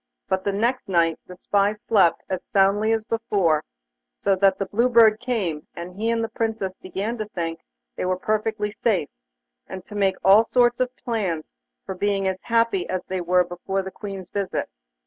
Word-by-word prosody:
But 190 Hz, 0 st, 0 dB
the 200 Hz, -, +2 dB
next 230 Hz, +4 st, -1 dB
night 170 Hz, -3 st, +2 dB
the 180 Hz, -, -10 dB
spy 200 Hz, +2 st, +1 dB
slept 210 Hz, -4 st, +2 dB
as 185 Hz, -, -3 dB
soundly 200 Hz, +3 st, +2 dB
as 225 Hz, -1 st, 0 dB
before, 200 Hz, -10 st, +1 dB, 0.5 s
so 195 Hz, -, +1 dB
that 195 Hz, 0 st, +4 dB
the 195 Hz, -, -2 dB
Blue 235 Hz, +6 st, +1 dB
Bird 220 Hz, -2 st, +6 dB
came, 205 Hz, -12 st, -2 dB
and 175 Hz, +1 st, -7 dB
he 220 Hz, +3 st, -1 dB
and 230 Hz, 0 st, +1 dB
the -, -, -1 dB
Princess 220 Hz, -4 st, -2 dB
began 200 Hz, +6 st, -4 dB
to 215 Hz, -, -3 dB
think 165 Hz, -4 st, -4 dB, 0.4 s
they -, -, -3 dB
were 185 Hz, 0 st, 0 dB
perfectly 215 Hz, +1 st, -1 dB
safe, 205 Hz, -7 st, 0 dB, 0.6 s
and 190 Hz, -1 st, -8 dB
to -, -, -12 dB
make 195 Hz, -2 st, +1 dB
all 200 Hz, +3 st, +7 dB
sorts 240 Hz, +1 st, +2 dB
of 255 Hz, 0 st, -1 dB
plans 190 Hz, -10 st, -3 dB, 0.3 s
for -, -, -4 dB
being 195 Hz, 0 st, 0 dB
happy 230 Hz, -6 st, +1 dB
as 185 Hz, -1 st, -2 dB
they 185 Hz, -1 st, -3 dB
were 180 Hz, +1 st, +3 dB
before 180 Hz, +2 st, -3 dB
the 190 Hz, -, -7 dB
Queen's 195 Hz, -3 st, -8 dB
visit. 200 Hz, -2 st, -2 dB
200 Hz, 185 wpm, -23 LUFS, 185-225 Hz, 0.6 s, all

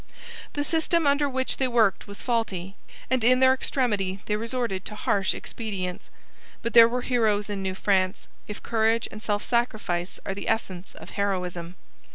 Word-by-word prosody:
The 290 Hz, -, -1 dB
system 325 Hz, +1 st, +1 dB
under 285 Hz, 0 st, +3 dB
which 260 Hz, 0 st, -1 dB
they 265 Hz, -, +1 dB
worked 225 Hz, -6 st, +2 dB
was 200 Hz, 0 st, -9 dB
faulty, 200 Hz, -6 st, -2 dB, 0.4 s
and 255 Hz, -3 st, +2 dB
in 255 Hz, +2 st, +5 dB
their 260 Hz, 0 st, +6 dB
extremity 210 Hz, -8 st, 0 dB
they 210 Hz, -, 0 dB
resorted 230 Hz, -3 st, -2 dB
to 210 Hz, -, -6 dB
harsh 200 Hz, -2 st, +1 dB
expedients. 195 Hz, -6 st, -5 dB, 0.5 s
But 235 Hz, -, -2 dB
there 230 Hz, -1 st, +9 dB
were 250 Hz, +1 st, -1 dB
heroes 215 Hz, -4 st, +1 dB
in 200 Hz, -1 st, -3 dB
New 190 Hz, -1 st, -2 dB
France, 190 Hz, -1 st, +1 dB, 0.2 s
if 210 Hz, -, -7 dB
courage 225 Hz, 0 st, +1 dB
and 215 Hz, -, -9 dB
self 205 Hz, -1 st, -1 dB
sacrifice 215 Hz, -7 st, -1 dB
are 195 Hz, -, -2 dB
the 200 Hz, -, -4 dB
essence 190 Hz, -4 st, -2 dB
of -, -, -11 dB
heroism. 180 Hz, -3 st, -2 dB
215 Hz, 170 wpm, -26 LUFS, 195-245 Hz, 0.5 s, there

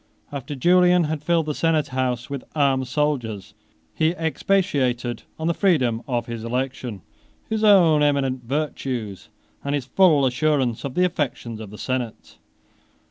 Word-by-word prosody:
12 140 Hz, -1 st, -5 dB
After 145 Hz, -, -7 dB
Julian 180 Hz, +4 st, +4 dB
had 155 Hz, -1 st, -2 dB
filled 165 Hz, +1 st, +1 dB
the 150 Hz, -, -2 dB
senate 160 Hz, -1 st, +1 dB
house 125 Hz, -2 st, -1 dB
with 140 Hz, -2 st, -5 dB
armed 135 Hz, -3 st, +2 dB
soldiers, 125 Hz, -8 st, -2 dB, 0.4 s
he 160 Hz, +2 st, +1 dB
expatiated 140 Hz, -, 0 dB, 0.2 s
on 160 Hz, -, -4 dB
the 170 Hz, -, +2 dB
freedom 130 Hz, -, +2 dB
of 120 Hz, -3 st, -1 dB
his 115 Hz, -2 st, -6 dB
election, 125 Hz, -4 st, -3 dB, 0.4 s
his 220 Hz, 0 st, -2 dB
own 175 Hz, -8 st, +6 dB
eminent 135 Hz, -3 st, +1 dB
virtues, 125 Hz, -6 st, -3 dB, 0.3 s
and 140 Hz, +1 st, -1 dB
his 140 Hz, -4 st, -3 dB
full 150 Hz, 0 st, +4 dB
assurance 130 Hz, -2 st, +1 dB
of 135 Hz, -2 st, -5 dB
the 180 Hz, -, +3 dB
affections 125 Hz, -9 st, -3 dB
of 110 Hz, -2 st, -8 dB
the 105 Hz, -, -10 dB
senate. 125 Hz, -2 st, -4 dB
140 Hz, 150 wpm, -23 LUFS, 125-160 Hz, 0.4 s, own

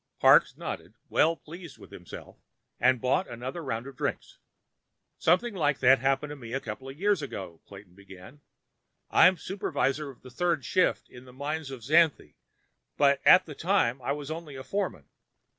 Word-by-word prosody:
Parks -, -, +5 dB
nodded, -, -, -7 dB
well 165 Hz, +1 st, +3 dB
pleased 165 Hz, -1 st, -12 dB
with -, -, -15 dB
himself, -, -, -11 dB, 0.4 s
and 130 Hz, 0 st, +3 dB
bought 130 Hz, +10 st, +1 dB
another 130 Hz, +8 st, -6 dB
round 115 Hz, -4 st, -4 dB
of 135 Hz, -1 st, -10 dB
drinks. -, -, -4 dB, 0.8 s
"Something 185 Hz, +8 st, +2 dB
like 150 Hz, -6 st, +1 dB
that 130 Hz, +1 st, +5 dB
happened 135 Hz, +3 st, 0 dB
to -, -, -6 dB
me 120 Hz, -4 st, -9 dB
a 135 Hz, -, 0 dB
couple 130 Hz, +3 st, -7 dB
of 135 Hz, -, -10 dB
years 200 Hz, -3 st, +2 dB
ago," 95 Hz, -, -7 dB
Clayton 100 Hz, -2 st, -13 dB
began. 100 Hz, +8 st, -14 dB, 0.7 s
"I'm 185 Hz, 0 st, +6 dB
supervisor 150 Hz, -6 st, -2 dB
on 135 Hz, -, -13 dB
the 130 Hz, -, -12 dB
third 165 Hz, -1 st, -1 dB
shift 185 Hz, +9 st, +1 dB
in 125 Hz, +1 st, -14 dB
the 125 Hz, -, -15 dB
mines 145 Hz, +2 st, -4 dB
at 130 Hz, -4 st, -9 dB
Xanthe, 160 Hz, +4 st, +2 dB, 0.6 s
but 140 Hz, -1 st, +3 dB
at 185 Hz, 0 st, +8 dB
the 155 Hz, -, -8 dB
time, 140 Hz, -7 st, 0 dB
I 135 Hz, +3 st, -1 dB
was 145 Hz, +1 st, -6 dB
only 160 Hz, -3 st, -7 dB
a 130 Hz, -, -7 dB
foreman. 180 Hz, -, -3 dB
140 Hz, 175 wpm, -28 LUFS, 125-165 Hz, 0.8 s, at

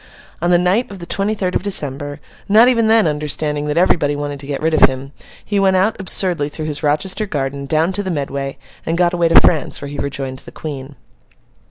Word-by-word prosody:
On 175 Hz, -, +1 dB
the 175 Hz, -, +5 dB
night 180 Hz, +7 st, +1 dB
of 200 Hz, -, -9 dB
the 170 Hz, -, -8 dB
twenty 200 Hz, +4 st, -1 dB
third 185 Hz, -3 st, -2 dB
of -, -, 0 dB
December, 145 Hz, -7 st, -2 dB, 0.3 s
not 220 Hz, +4 st, +6 dB
even 230 Hz, -3 st, +3 dB
then 225 Hz, -1 st, +4 dB
understanding 150 Hz, -1 st, -2 dB
that 150 Hz, +2 st, -2 dB
everybody 160 Hz, -5 st, +2 dB
wanted 145 Hz, -1 st, -4 dB
to 140 Hz, -, -9 dB
get 140 Hz, -1 st, -3 dB
rid 160 Hz, +1 st, 0 dB
of 155 Hz, -, +6 dB
him, 135 Hz, +1 st, -7 dB, 0.3 s
he 205 Hz, -1 st, 0 dB
went 190 Hz, -1 st, +3 dB
out, 205 Hz, +4 st, +2 dB
absurdly, 180 Hz, -5 st, +2 dB
through 155 Hz, +1 st, -5 dB
his 150 Hz, -1 st, -3 dB
Rochester 160 Hz, +8 st, 0 dB
garden, 140 Hz, -4 st, -3 dB
down 160 Hz, +4 st, +1 dB
to 195 Hz, +2 st, -1 dB
the 190 Hz, -, -4 dB
Medway, 140 Hz, -3 st, -3 dB, 0.3 s
and 165 Hz, +1 st, -2 dB
got 175 Hz, 0 st, +2 dB
away 175 Hz, -1 st, +2 dB
to 165 Hz, -, +7 dB
France, 155 Hz, -5 st, +2 dB
where 140 Hz, -, -7 dB
he 145 Hz, -, -6 dB
rejoined 135 Hz, -2 st, -4 dB
the -, -, -12 dB
Queen. 140 Hz, -2 st, -7 dB
155 Hz, 220 wpm, -18 LUFS, 145-185 Hz, 0.3 s, to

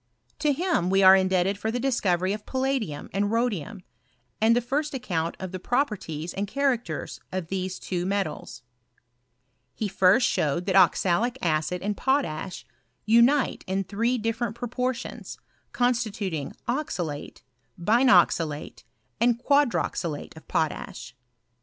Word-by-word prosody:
To 300 Hz, -, +2 dB
him 330 Hz, -, 0 dB
we 195 Hz, +1 st, +3 dB
are 190 Hz, 0 st, +9 dB
indebted 190 Hz, +1 st, +1 dB
for 220 Hz, -, -2 dB
the 240 Hz, +2 st, -1 dB
discovery 195 Hz, -8 st, +1 dB
of 210 Hz, 0 st, -7 dB
palladium 260 Hz, -, -2 dB
and 205 Hz, +1 st, +1 dB
rhodium, 215 Hz, -4 st, -1 dB, 0.6 s
and 225 Hz, +1 st, +5 dB
the -, -, +4 dB
first 280 Hz, +5 st, -2 dB
account 170 Hz, -10 st, -2 dB
of 185 Hz, -2 st, -5 dB
the 185 Hz, -, -5 dB
properties 185 Hz, -, -2 dB
and 200 Hz, +1 st, -2 dB
characters 245 Hz, -, -2 dB
of 185 Hz, -3 st, -4 dB
these 185 Hz, -1 st, -3 dB
two 180 Hz, -1 st, -3 dB
metals. 190 Hz, -10 st, -3 dB, 1.1 s
He 215 Hz, -, -2 dB
first 195 Hz, +5 st, +4 dB
showed 155 Hz, +4 st, 0 dB
that 190 Hz, -1 st, 0 dB
oxalic 195 Hz, +5 st, +3 dB
acid 170 Hz, 0 st, -1 dB
and 205 Hz, +1 st, -1 dB
potash 225 Hz, -, -1 dB, 0.4 s
unite 235 Hz, +6 st, +4 dB
in 190 Hz, +1 st, 0 dB
three 230 Hz, +6 st, 0 dB
different 225 Hz, 0 st, -2 dB
proportions, 245 Hz, +1 st, -4 dB, 0.3 s
constituting 215 Hz, -, -1 dB
oxalate, 180 Hz, -, -3 dB, 0.4 s
binoxalate, 175 Hz, -, +3 dB, 0.4 s
and 235 Hz, 0 st, +3 dB
quadroxalate 240 Hz, -, 0 dB
of 160 Hz, -, -14 dB
potash. 150 Hz, -5 st, -3 dB
205 Hz, 125 wpm, -26 LUFS, 180-245 Hz, 1.1 s, are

